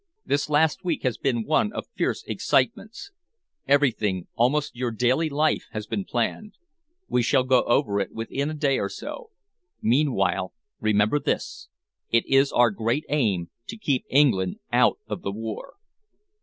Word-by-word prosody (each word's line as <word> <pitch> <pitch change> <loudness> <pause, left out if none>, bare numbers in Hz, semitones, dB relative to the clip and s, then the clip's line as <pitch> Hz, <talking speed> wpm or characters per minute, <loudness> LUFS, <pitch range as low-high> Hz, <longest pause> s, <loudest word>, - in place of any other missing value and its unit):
This 145 +1 0
last 150 +1 +2
week 175 -4 -2
has 125 -3 -1
been 120 -4 0
one 210 +8 +2
of - - -5
fierce - - -1
excitements. 245 - -1 0.6
Everything, 115 -10 +2
almost 135 +5 +1
your 125 0 -2
daily 125 +8 +1
life, 155 +2 +1
has 110 -1 -4
been 105 -4 -3
planned. 125 - -2 0.5
We 125 - +1
shall 125 +2 +3
go 130 -1 +4
over 105 -4 +2
it 100 - -2
within 135 +6 -3
a 155 - -4
day 140 -3 +1
or - - -2
so. 480 -3 -8 0.5
Meanwhile, 115 -8 +1 0.3
remember 110 +5 +2
this. - - -3 0.4
It 115 0 +2
is 135 +1 +3
our 120 -2 +4
great 115 +8 -1
aim 105 - 0 0.2
to 225 - -7
keep 145 - -1
England 115 -10 +3 0.2
out - - +4
of - - -5
the 100 - -3
war." 110 +1 -6
125 Hz, 155 wpm, -25 LUFS, 110-150 Hz, 0.6 s, go